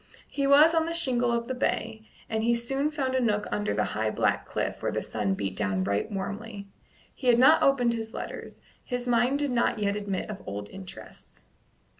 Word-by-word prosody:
He 280 -1 -1
was 300 +4 +7
on 325 0 +2
the 335 - -2
shingle 245 -7 +1
of 235 0 -1
the 260 - -2
bay, 225 -3 -2 0.3
and 220 -1 -1
he 235 +1 +3
soon 270 +5 0
found 275 -4 -2
a 260 - +2
nook 210 -4 +1
under 210 0 -1
a - - +1
high 110 0 -1
black - - 0
cliff - - -3
where - - -1
the - - -1
sun 100 -2 -1
beat 95 -1 -3
down 95 -2 0
right 100 - -1
warmly. 205 +1 -5 0.5
He 260 - -6
had 240 -1 +6
not 265 +6 +6
opened 250 -4 +3
his 225 -1 -5
letters; - - -7 0.2
his 245 -1 -4
mind 245 +3 +3
did 290 -2 -1
not 235 -1 +1
yet 200 -1 0
admit 200 -3 -3
of 210 -2 -7
old 100 +1 -5
interests. 190 -1 -12
235 Hz, 205 wpm, -27 LUFS, 200-260 Hz, 0.5 s, was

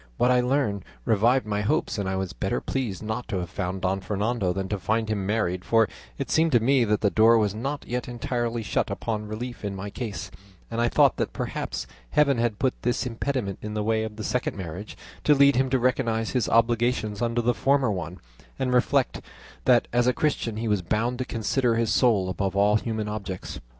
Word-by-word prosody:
What 125 - +3
I 125 0 +4
learned 125 -7 0 0.2
revived 115 +4 +3
my 105 -1 -1
hopes, 120 +1 0
and 95 -2 -1
I 95 - -1
was 95 -2 -3
better - - -1
pleased 115 -8 -3
not 110 +3 -3
to 105 - -2
have 90 -1 -4
found 90 +1 -3
Don 95 +1 +1
Fernando 105 0 -1
than 95 +1 -3
to 100 - -2
find 110 +3 0
him 100 -3 -2
married, 95 -4 0
for 115 -1 +3 0.3
it - - -4
seemed 160 -1 +3
to 120 - +6
me 130 +2 +3
that 105 -1 +1
the 100 - +2
door 115 +1 +6
was 105 -3 +1
not 135 +7 -4
yet 125 0 -3
entirely 120 -2 -2
shut - - 0
upon 105 -2 -3
relief 120 +3 -6
in 100 -1 -3
my 100 +1 -6
case, 105 -9 -5 0.4
and 115 +1 -1
I 120 - +3
thought - - +4
that - - -2
perhaps - - -4 0.2
Heaven 140 -4 +3
had 115 -3 0
put 130 +3 +1
this 120 +2 0
impediment 120 -4 -2
in 105 0 -5
the 105 - -1
way 110 +1 +1
of 110 -1 -4
the 110 - -6
second 125 -1 -1
marriage, 90 +3 -7 0.3
to 150 - +5
lead 140 0 +6
him 130 +1 +2
to 130 - +2
recognise 120 -3 0
his 125 -4 0
obligations 115 -2 +2
under 120 0 0
the 120 +1 +3
former 135 -2 +2
one, 90 -1 -5 0.4
and 125 -1 -1
reflect 130 +2 +2 0.4
that 125 -2 +4
as 120 0 +3
a 125 - +4
Christian 120 -8 -1
he 115 +1 -2
was 105 -3 +1
bound 115 +7 -1
to 130 - -1
consider 120 +1 0
his 115 -1 +1
soul 110 -7 +3
above 95 +1 -2
all 105 +1 +4
human 110 -1 -3
objects. 100 -3 -5
115 Hz, 215 wpm, -26 LUFS, 105-125 Hz, 0.4 s, to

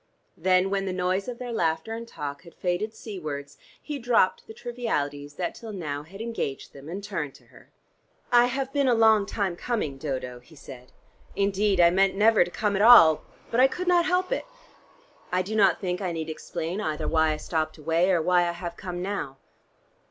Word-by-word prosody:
Then 185 +2 +2
when 195 -1 -1
the 185 - -2
noise 185 +2 -1
of 245 -1 -5
their 245 -1 -5
laughter 165 +1 -1
and 230 +1 -6
talk 145 -8 -6
had 170 -2 -16
faded 190 +5 -2
seawards, 150 -9 -7 0.2
he 295 -2 -6
dropped 235 -6 +2
the 220 - -9
trivialities 145 -13 -3
that 175 +1 -3
till 225 -2 -9
now 150 -8 -4
had 190 +7 -11
engaged 225 -12 -4
them, 140 +2 -11
and 195 +4 -6
turned 165 -9 -4
to - - -19
her. - - -18 0.6
"I 240 0 +6
have 265 +2 -3
been 280 -2 +2
a 245 - +4
long 220 -3 +4
time 195 -5 -2
coming, 175 - -3
Dodo," 130 -4 -4
he 140 +6 -19
said. 130 -3 -12 0.4
"Indeed, 200 0 +1
I 170 0 +7
meant 195 +2 +3
never 215 0 +5
to 175 - -7
come 205 +2 -1
at 195 - +1
all. 205 -9 +8 0.3
But 230 - +1
I 260 - +7
could 360 +7 -5
not 350 -1 +4
help 365 +3 0
it. - - -1 0.9
I 185 +1 +1
do 215 +4 -5
not 195 -5 +4
think 180 -1 -3
I 185 -2 -1
need 160 -1 -4
explain 170 +4 -4
either 155 -4 -2
why 160 -1 +3
I - - -4
stopped 155 0 -2
away 165 +4 +1
or 175 -4 +2
why 175 0 +3
I 170 - -2
have 170 0 -6
come 180 -1 -5
now." 185 -9 -4
185 Hz, 205 wpm, -26 LUFS, 160-220 Hz, 0.9 s, all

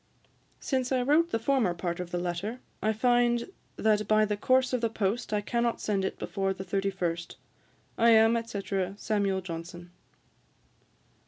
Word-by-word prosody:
Since 260 -2 -1
I 255 -1 +2
wrote 310 +6 +3
the 225 - 0
former 225 -6 +1
part 170 0 -3
of 180 -1 -5
the 175 - -2
letter, 180 +7 -3 0.2
I 215 - +2
find 240 - +2 0.2
that 210 -1 +1
by 215 0 +4
the 210 0 -1
course 255 +4 +2
of 250 - +1
the 230 - +1
post 220 +3 -2
I 210 -1 +1
cannot 235 +2 -1
send 200 -2 -1
it - - -2
before 195 +1 -2
the 190 - -6
thirty 195 +1 -1
first. 170 -3 -3 0.6
I 230 +1 +5
am, 225 0 +6
&c. 230 -3 -5 0.4
SAM. 200 -3 0
JOHNSON.' 175 0 -7
215 Hz, 165 wpm, -28 LUFS, 190-235 Hz, 0.6 s, am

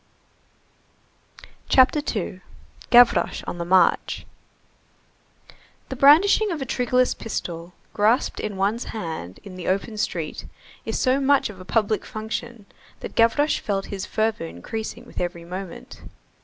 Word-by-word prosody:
CHAPTER 260 +3 +5 0.2
II—GAVROCHE 220 +5 +1
ON 175 - -5
THE 170 - -3
MARCH 185 +1 +2 1.6
The 265 - -4
brandishing 330 - +6
of 335 -4 -3
a 270 - -3
triggerless 250 0 +1
pistol, 175 -5 -5 0.2
grasped 215 +5 +2
in 210 -2 -4
one's 205 +5 0
hand 160 - -6
in 185 -2 -10
the 180 - -6
open 200 +3 -1
street, 165 -6 -3 0.4
is - - -2
so 260 +1 +2
much 275 -4 +2
of 190 - -14
a 185 - -10
public 215 +1 0
function 220 0 -6 0.4
that - - -7
Gavroche 285 +7 +3
felt 195 -2 -2
his 195 -1 -4
fervor 220 - -1
increasing 220 - -6
with - - -7
every 175 -1 -4
moment. 185 +1 -8
215 Hz, 130 wpm, -23 LUFS, 185-250 Hz, 1.6 s, brandishing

